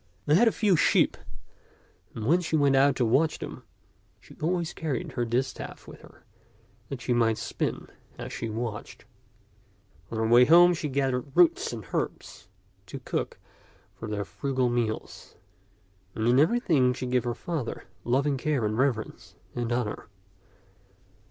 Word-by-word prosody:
They 145 - +2
had 230 +9 +5
a - - +5
few 205 -4 +2
sheep, - - +3 1.0
and 110 - -5
when 170 +8 +3
she 160 -2 -2
went 140 -3 +3
out 135 0 +4
to 125 - +1
watch 150 +8 +2
them, - - -8 0.6
she - - -17
always 170 +1 -1
carried 150 -6 -3
her 120 - -2
distaff 125 +3 -3
with - - -12
her - - -18 0.7
that 135 -3 -6
she 125 - 0
might 115 -2 +2
spin - - -3 0.3
as - - -7
she 115 - -4
watched. 110 -1 -6 1.0
On 115 - -5
her 110 - 0
way 120 +2 +7
home 175 +4 +7
she 155 -3 -3
gathered 135 0 -1
roots 175 -2 +4
and 110 -5 -7
herbs - - -4 0.4
to - - -7
cook - - -3 0.6
for 105 +3 -8
their 105 -1 -3
frugal 130 -3 -1
meals; 115 -2 -3 0.8
and 110 +1 -1
in 125 +2 +5
everything 155 - +3
she 130 - -5
gave 125 0 +1
her 120 -1 -2
father 155 -9 -4 0.2
loving 135 +3 +1
care 135 -3 0
and 110 +2 -1
reverence 130 -5 -2 0.2
and 120 -1 -3
honor. 120 -3 -2
130 Hz, 155 wpm, -27 LUFS, 120-155 Hz, 1.0 s, way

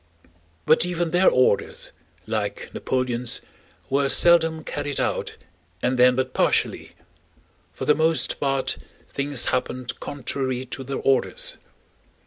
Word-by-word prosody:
But - - +5
even 175 -2 -1
their 180 +2 +5
orders, 125 -6 +1 0.3
like - - -3
Napoleon's, 125 -2 -1 0.5
were 140 0 +1
seldom 165 -1 +4
carried 145 -2 -3
out, - - -2 0.5
and 125 0 +1
then 125 0 +6
but 130 0 -1
partially. - - +1 0.8
For - - -6
the 150 - +5
most 160 +1 +1
part 135 -1 -1 0.3
things 140 -2 0
happened 125 0 -2
contrary 130 -1 -3
to 130 +1 -7
their 135 +1 -4
orders. 135 -2 0
135 Hz, 115 wpm, -24 LUFS, 130-150 Hz, 0.8 s, then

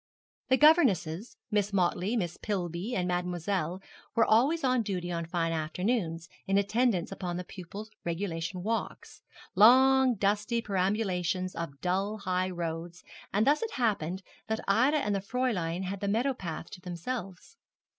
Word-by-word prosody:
The 260 - +4
governesses, 245 - +3
Miss 205 -1 +1
Motley, 190 +3 +1
Miss 175 -5 -2
Pillby, 185 +2 -3
and 180 -4 0
Mademoiselle 180 0 -2 0.3
were 225 - +5
always 275 +9 +3
on 255 -2 +3
duty 180 -4 -3
on 170 -1 -3
fine 165 -1 0
afternoons, 165 +1 -1 0.2
in 195 +1 +3
attendance 200 -2 +1
upon 180 -2 -4
the 180 - -4
pupils' 200 +4 -9
regulation 170 0 -3
walks 225 +2 -4 0.3
long 260 +4 +6
dusty 210 +4 +1
perambulations 185 -3 -1
of 140 -5 -6
dull 195 +4 0
high 185 -2 -1
roads; 170 0 -5 0.3
and 210 +3 +2
thus 290 +2 +3
it 455 -1 -3
happened 190 - -1 0.2
that 220 0 -1
Ida 255 +10 +4
and 210 -8 0
the 200 - +1
Fräulein 200 -6 -1
had 190 +1 -4
the 200 - -2
meadow 235 +7 +1
path 170 -7 -6
to 180 - -10
themselves. 185 - -6
195 Hz, 145 wpm, -29 LUFS, 175-225 Hz, 0.3 s, long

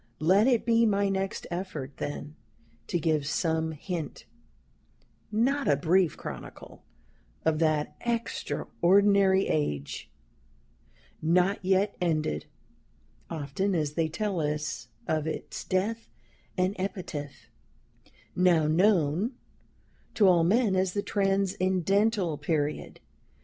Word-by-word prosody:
Let 190 +9 +4
it 240 -4 +2
be 230 0 +4
my 200 -1 +2
next 195 0 -2
effort, 165 -7 -5
then, 145 +1 -5 0.5
to 175 - 0
give 155 -3 0
some 160 0 0
hint 160 -1 -5 1.1
not 265 +6 +1
a 145 - +5
brief 175 +4 +2
chronicle - - -9 0.6
of 160 -1 +2
that 155 -2 +1
extraordinary 200 -4 +2
age, 75 - -2 1.1
not 180 +5 +2
yet 190 +2 +2
ended 155 - -1 0.8
(often 160 +7 -2
as 150 -3 -1
they 165 0 +1
tell 195 +2 -2
us 150 -5 -3 0.2
of 155 -1 0
its 160 - -5
death 215 +5 -1 0.5
and 185 +2 +1
epitaph), 180 -7 -5 0.8
now 175 -4 +4
known 175 - +2 0.8
to 205 - +5
all 175 -3 +5
men 205 +3 +3
as 185 -1 +1
the 205 - -1
Transcendental 195 -2 +1
Period. 150 -1 -2
180 Hz, 105 wpm, -28 LUFS, 155-200 Hz, 1.1 s, a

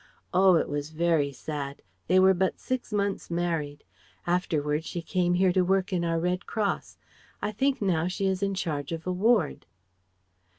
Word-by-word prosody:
Oh! 185 0 +6
it 165 - +2
was 145 +1 -3
very 160 -3 +1
sad; 140 +1 -6 0.2
they 185 +2 +5
were 190 0 +6
but 190 0 0
six 255 -3 -3
months 200 -1 -1
married. 165 -4 -2 0.4
Afterwards 160 -3 0
she 175 - -4
came 175 +1 +1
here 185 0 +3
to 185 - +3
work 190 +1 +1
in 175 -2 +1
our 165 -1 0
Red 180 +2 -1
Cross 210 -3 -2 0.4
I - - -2
think 265 +3 0
now 170 -4 +1
she 190 +2 -2
is 190 0 0
in 195 -1 0
charge 150 -6 -3
of 165 -1 -5
a 185 - -1
ward..." 200 -2 +1
180 Hz, 175 wpm, -27 LUFS, 160-190 Hz, 0.4 s, Oh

